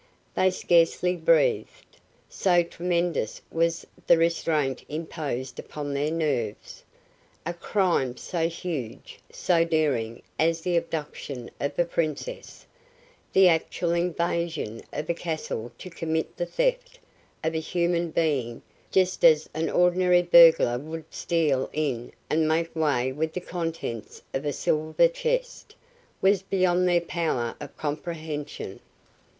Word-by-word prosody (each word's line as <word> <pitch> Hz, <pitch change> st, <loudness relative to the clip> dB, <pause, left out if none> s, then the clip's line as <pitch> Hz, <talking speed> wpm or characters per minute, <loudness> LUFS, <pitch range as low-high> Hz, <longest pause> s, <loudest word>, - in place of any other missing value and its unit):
They 185 Hz, -, +3 dB
scarcely 180 Hz, 0 st, +2 dB
breathed, -, -, +1 dB, 0.3 s
so 175 Hz, -2 st, +2 dB
tremendous 170 Hz, -7 st, -1 dB
was 165 Hz, 0 st, 0 dB, 0.2 s
the 170 Hz, -, +7 dB
restraint 160 Hz, -5 st, +1 dB
imposed 145 Hz, -5 st, -4 dB
upon 145 Hz, -1 st, -5 dB
their 145 Hz, +2 st, 0 dB
nerves. 145 Hz, -10 st, -2 dB, 0.6 s
A 170 Hz, -, -2 dB
crime 170 Hz, -, 0 dB
so 165 Hz, -2 st, -1 dB
huge, 165 Hz, -9 st, -6 dB
so 170 Hz, -2 st, +2 dB
daring 145 Hz, -9 st, 0 dB, 0.2 s
as 165 Hz, +1 st, +2 dB
the 175 Hz, +1 st, 0 dB
abduction 150 Hz, -6 st, -4 dB
of 140 Hz, -, -3 dB
a 175 Hz, -, +3 dB
Princess, 170 Hz, -, -4 dB, 0.7 s
the 190 Hz, -1 st, +6 dB
actual 170 Hz, 0 st, +1 dB
invasion 170 Hz, -7 st, -1 dB
of 150 Hz, +1 st, -4 dB
a 170 Hz, -, +1 dB
castle 155 Hz, -9 st, -4 dB
to 185 Hz, -, -9 dB
commit 160 Hz, -1 st, -2 dB
the 175 Hz, -, -3 dB
theft -, -, -1 dB, 0.5 s
of 160 Hz, +1 st, 0 dB
a 160 Hz, -, 0 dB
human 170 Hz, +1 st, 0 dB
being 140 Hz, -8 st, -1 dB, 0.3 s
just 185 Hz, -1 st, +1 dB
as 155 Hz, -2 st, +6 dB
an 160 Hz, +1 st, -1 dB
ordinary 180 Hz, 0 st, +4 dB
burglar 165 Hz, -8 st, +7 dB
would 160 Hz, +3 st, -7 dB
steal 150 Hz, -6 st, 0 dB
in 130 Hz, -6 st, -2 dB, 0.2 s
and 155 Hz, 0 st, +2 dB
make 165 Hz, +1 st, 0 dB
way 140 Hz, -5 st, +1 dB
with 155 Hz, +4 st, -2 dB
the -, -, -2 dB
contents 165 Hz, -10 st, -5 dB
of 135 Hz, +2 st, -2 dB
a 145 Hz, -, +1 dB
silver 155 Hz, -, +2 dB
chest, -, -, -3 dB, 0.5 s
was 195 Hz, 0 st, +4 dB
beyond 185 Hz, -2 st, +2 dB
their 175 Hz, -1 st, +3 dB
power 165 Hz, -9 st, -2 dB
of 145 Hz, -, -9 dB
comprehension. 150 Hz, -, -5 dB
165 Hz, 125 wpm, -26 LUFS, 150-175 Hz, 0.7 s, the